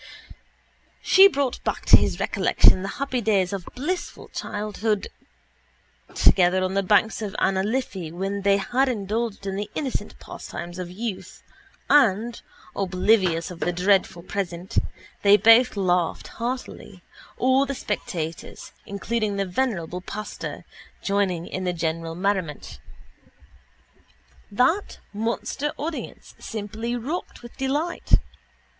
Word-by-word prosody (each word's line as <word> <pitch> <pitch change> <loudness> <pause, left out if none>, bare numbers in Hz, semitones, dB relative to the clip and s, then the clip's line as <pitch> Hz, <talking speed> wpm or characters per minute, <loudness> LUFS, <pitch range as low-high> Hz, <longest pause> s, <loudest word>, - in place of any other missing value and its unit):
She 385 +1 +8
brought 280 -8 -2
back - - -2
to - - +9
his - - +2
recollection 185 - +4
the 195 - -4
happy 265 -3 -1
days 200 -4 +1
of 190 -3 -5
blissful 345 +8 -4
childhood 210 0 -2 1.1
together 185 0 +4
on 185 0 -1
the 195 - +2
banks 210 +3 +2
of 210 -1 -4
Anna 190 0 +2
Liffey 195 -6 -2
when 195 +3 -3
they 200 0 +4
had 250 +7 +1
indulged 215 -1 -2
in 195 -1 -2
the 205 - -4
innocent 270 -4 -3
pastimes 175 +1 -8
of 180 - -4
the 180 - -12
young 220 -2 -3 0.6
and, 235 -4 +3 0.3
oblivious 185 -3 +2
of 175 - -9
the 175 - 0
dreadful 180 -1 +1
present, 185 -1 -2 0.4
they 205 0 +7
both 230 +1 +6
laughed 180 -3 0
heartily, 235 -6 -6 0.3
all 260 +2 +3
the 275 - -3
spectators, 170 -7 -5 0.2
including 210 +1 -2
the 200 0 0
venerable 180 -4 -2
pastor, 210 +3 -6 0.4
joining 195 -4 0
in 185 - -5
the 180 -1 0
general 165 0 -3
merriment. 180 - -2 1.7
That 260 - +1 0.2
monster 230 +7 -2
audience 310 +2 -6
simply 220 +2 -4
rocked 265 +4 -5
with 240 - -11
delight. 290 +6 -2
200 Hz, 125 wpm, -24 LUFS, 185-235 Hz, 1.7 s, to